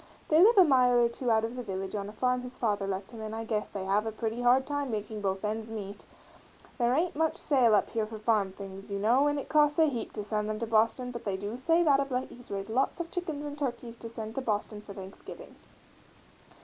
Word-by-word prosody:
They 315 +2 +6
live 445 +4 +6
a 380 - +10
mile 255 -5 +4
or 235 -1 +4
two 245 +1 -3
out 220 0 +3
of 230 +2 -5
the 250 - -4
village 190 -4 -5
on 200 -1 -3
a - - -7
farm 250 +3 0
his 250 0 -9
father 205 -4 0
left 195 +1 -4
him 230 -2 -9
and 220 0 -5
I 225 - -4
guess 215 -2 -2
they 195 -2 -5
have 210 +3 0
pretty 225 +1 -2
hard 250 +2 +4
times 285 -2 -2
making 215 -1 -4
both 195 0 -1
ends 220 +1 -3
meet 205 -2 -7 0.7
there 240 +1 +3
ain't 335 +2 0
much 320 +1 +1
sale 250 -7 +4
up - - +1
here 220 -2 -1
for 220 0 -7
farm 215 -3 +1
things, 195 0 -9
you 200 - -2
know, 240 +8 +3
and 290 0 +1
it 280 - -4
costs 295 -1 +3
a 320 - +6
heap 245 -6 -3
to 210 - -4
send 210 0 -2
them 215 - -2
to 230 - -2
Boston 230 +3 +2
but 235 -1 -7
they 195 -2 -2
do 205 +3 -5
say 330 +7 +2
that 285 -4 +4
of 275 0 -1
late 255 0 -2
he's 245 0 -14
raised 195 +2 -4
lots 260 +8 +1
of 335 -1 -4
chickens 315 -5 -4
and 290 0 -6
turkeys 245 -4 -3
to 230 - -8
send 220 -1 -6
to 270 - -3
Boston 210 -2 -2
for 200 -1 -11
Thanksgiving. 190 0 -10
230 Hz, 250 wpm, -29 LUFS, 210-260 Hz, 0.7 s, a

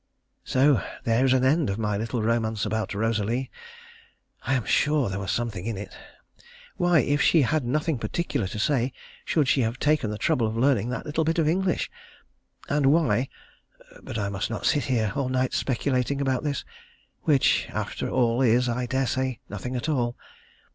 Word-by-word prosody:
So 135 -4 +3 0.2
there 115 +2 +2
is 130 - +3
an 130 -1 +3
end 145 0 +3
of 100 - -2
my 105 -2 -1
little 115 +2 -2
romance 110 -1 0
about 105 -2 -2
Rosalie. 115 +4 -1 0.9
I 130 - 0
am 125 - -1
sure 150 -6 +2
there 95 +1 -3
was 95 -1 -5
something 105 -2 -2
in 115 -3 -3
it. 95 -1 -8 0.8
Why, 175 -3 +3
if 145 0 +1
she 150 +2 +5
had 155 +3 +1
nothing 150 +3 -1
particular 120 - -2
to 100 - -6
say, 125 +2 +1 0.3
should 150 -4 +1
she 135 - +3
have 115 +1 -1
taken 150 -5 +1
the 105 - -4
trouble 115 +1 +1
of 110 +1 -4
learning 125 -3 +2
that 125 - -4
little 155 +2 0
bit 165 +2 0
of 160 -2 +2
English? 180 +2 0 0.8
and 145 -1 +2
why 135 -5 +3 0.7
but - - -6
I 100 -2 -1
must 95 -1 -3
not 115 - -4
sit 145 - +2
here 110 -6 0
all 135 -2 -1
night 130 0 0
speculating 130 +1 0
about 135 -1 0
this, 145 -2 -2 0.6
which 145 -4 +3
after - - -3
all 120 -1 +2
is, 125 0 +3
I 120 +1 -1
daresay, 130 -1 -1
nothing 125 0 -5
at 125 +4 -3
all. 120 -6 0
125 Hz, 180 wpm, -25 LUFS, 115-140 Hz, 0.9 s, she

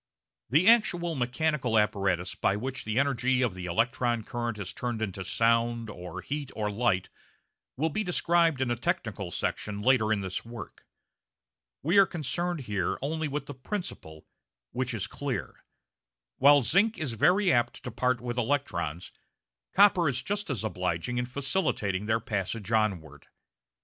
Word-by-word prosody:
The 155 - +4
actual 175 -7 +4
mechanical 130 -2 0
apparatus 95 -4 +1
by 100 - +1
which 130 +5 -4
the 110 +1 -2
energy 130 -2 +2
of 120 -6 0
the 90 -1 -6
electron 115 +4 0
current 120 -1 -3
is 100 -3 -6
turned 120 -2 -3
into 95 -3 -3
sound, 115 +2 +1
or 90 -3 -7
heat, 145 -1 -4
or 105 -1 -1
light 100 -4 +1 0.7
will 160 +4 0
be 215 - -1
described 170 -5 +2
in 125 -2 +1
a - - +1
technical 110 -4 -2
section 100 +4 -3
later 110 -1 +3
in 105 -2 +1
this 95 -1 -4
work. 115 0 -10 1.0
We 175 +7 +4
are 195 - +7
concerned 175 +1 -2
here 100 -7 -1
only 155 +2 -1
with 145 0 -3
the 145 - -7
principle, 130 - -6 0.5
which 130 0 -1
is 100 - -2
clear. 135 -7 -5 0.7
While 145 +1 +6
zinc 195 - +3
is 145 -7 -2
very 185 - +3
apt 120 -1 0
to 125 - -5
part 125 +2 +1
with 120 0 -3
electrons, 90 - -2 0.6
copper 190 -5 +5
is 130 -2 -2
just 205 0 -2
as 125 -6 -2
obliging 90 +3 -2
in 125 - -2
facilitating 130 - -1
their 110 +1 +2
passage 105 0 -3
onward. 90 -10 -1
120 Hz, 155 wpm, -28 LUFS, 105-145 Hz, 1.0 s, are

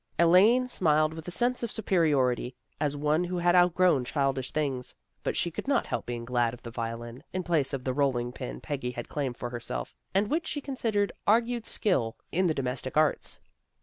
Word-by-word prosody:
Elaine 200 +9 +5
smiled 155 -8 +2
with 160 0 -9
a - - -2
sense 245 +8 +1
of 235 - -3
superiority, 145 - +1 0.2
as 145 -1 0
one 150 +3 +2
who 180 +1 -3
has 175 0 +3
outgrown 180 -5 +4
childish 135 -1 -1
things, 135 -5 -2 0.3
but - - -2
she 170 - +1
could 170 - -6
not 275 -3 +2
help - - -3
being 120 -1 -4
glad 120 -1 +1
of - - -20
the 115 - -7
violin, 115 +1 -5
in 185 0 -2
place 160 -6 +1
of 135 -3 -3
the 130 - -1
rolling 125 -3 +1
pin - - -6
Peggy 135 - -3
had 120 -1 -6
claimed 135 -5 -3
for 120 - -5
herself, 115 - -4 0.2
and 200 +2 +3
which 325 +2 0
she 290 - -3
considered 225 -8 -1 0.2
argued 230 +2 +2
skill 125 - +1 0.2
in 185 +2 +2
the 160 - +1
domestic 130 +1 -3
arts. 155 -1 +1
150 Hz, 195 wpm, -28 LUFS, 125-185 Hz, 0.3 s, Elaine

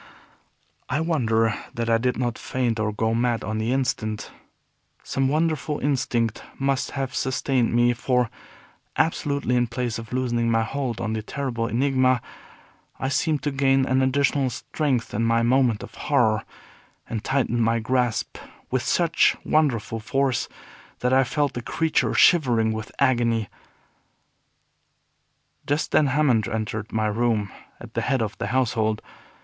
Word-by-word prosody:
I 130 +3 0
wonder 115 -9 +1 0.2
that 115 0 -2
I 115 0 +3
did 125 +1 0
not 120 -2 -2
faint 120 -3 -1
or 110 0 0
go 110 +2 0
mad 120 0 0
on 110 0 -3
the 110 +2 -1
instant. 125 -5 -2 0.7
Some 135 0 0
wonderful 155 0 0
instinct 120 -5 0 0.2
must 135 -1 0
have 135 -1 -2
sustained 130 -2 0
me; 120 +1 +3
for, 125 -1 0 0.7
absolutely, 140 -5 0
in 120 0 +2
place 120 -1 -3
of 115 - -10
loosening 120 -2 0
my 115 0 +2
hold 125 0 -3
on 110 -1 -2
the 110 - -2
terrible 120 -1 -3
Enigma, 130 +1 +2 0.8
I 130 - -1
seemed 150 +1 0
to 145 - 0
gain 135 -1 +2
an 130 0 +2
additional 135 0 +2
strength 130 -1 -2
in 115 - 0
my 115 0 +2
moment 120 -3 +2
of - - -10
horror, 120 -7 +1 0.6
and 110 -2 -4
tightened 125 -3 0
my 115 +1 +2
grasp 120 0 -1 0.3
with 130 -1 +1
such 165 +5 +2
wonderful 115 -7 +1
force 130 +3 0 0.5
that 125 +1 +1
I 135 0 +5
felt 145 +2 -1
the 120 - -4
creature 160 +6 0
shivering 120 -10 +4
with 110 0 -5
agony. 115 -4 +2 2.2
Just 145 +2 0
then 150 - +4
Hammond 130 -6 +2
entered 110 -1 -3
my 110 -1 0
room 110 -1 0 0.3
at - - -11
the - - -1
head 135 -4 +1
of 105 -1 -4
the - - -2
household. 110 -4 +1
125 Hz, 145 wpm, -24 LUFS, 115-135 Hz, 2.2 s, I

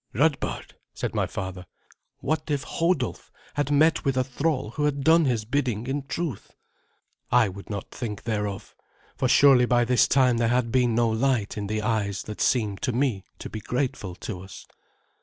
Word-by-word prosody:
"Radbard," 145 +5 0 0.2
said - - -3
my - - 0
father, 95 -1 -6 0.5
"what 155 +2 -2
if 145 -3 0
Hodulf 165 -7 -1 0.2
had 145 -1 -1
met 155 +3 +3
with 135 -2 0
a 130 - +3
thrall 130 -2 -1
who 150 +4 -1
had 140 -2 0
done 160 +2 +5
his 120 -5 0
bidding 120 -3 -1
in 135 +1 -3
truth?" 160 - -4 0.8
I 120 -2 +5
would 100 +1 -10
not 100 -3 -5
think 105 -5 -5
thereof, 105 -3 -3 0.4
for 130 - 0
surely 125 -1 +6
by 120 -1 +3
this 125 +1 +4
time 130 -3 +3
there 115 0 +2
had 120 0 +1
been 125 -2 +2
no 120 0 +3
light 115 -1 0
in 105 -1 -4
the 110 +1 -2
eyes 100 -4 -1
that 105 - -7
seemed 105 -6 +1
to 125 - 0
me 120 -6 0
to - - -7
be 110 - -7
grateful 125 -6 -2
to 90 -1 -6
us. 95 +1 -11
125 Hz, 180 wpm, -25 LUFS, 105-140 Hz, 0.8 s, surely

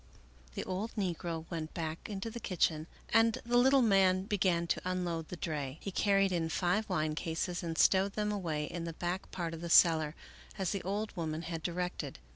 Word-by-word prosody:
The - - -2
old 195 +5 -4
negro 170 -5 -2
went 160 -2 -4
back 160 +1 -4
into 205 +2 -4
the 235 - -6
kitchen 160 -6 0 0.2
and 225 0 +4
the 240 +1 0
little 265 +1 +5
man 190 -3 +4
began 185 -4 +1
to - - -1
unload 175 -3 -2
the - - -6
dray. 150 -5 -3
He 195 - -5
carried 195 0 +3
in 165 -2 0
five 190 +6 0
wine 155 -4 0
cases 165 +3 -2
and 165 -2 -4
stowed 195 +3 +4
them 210 0 -1
away 165 -7 -2
in 170 +2 -5
the 165 - -4
back 175 +3 -3
part 170 -2 -4
of 165 - -7
the 170 - -4
cellar 160 -2 +5 0.4
as 190 -3 -1
the 200 - -2
old 205 +3 -3
woman 160 -2 -3
had 165 -1 -4
directed. 175 -4 -3
180 Hz, 195 wpm, -32 LUFS, 165-195 Hz, 0.4 s, little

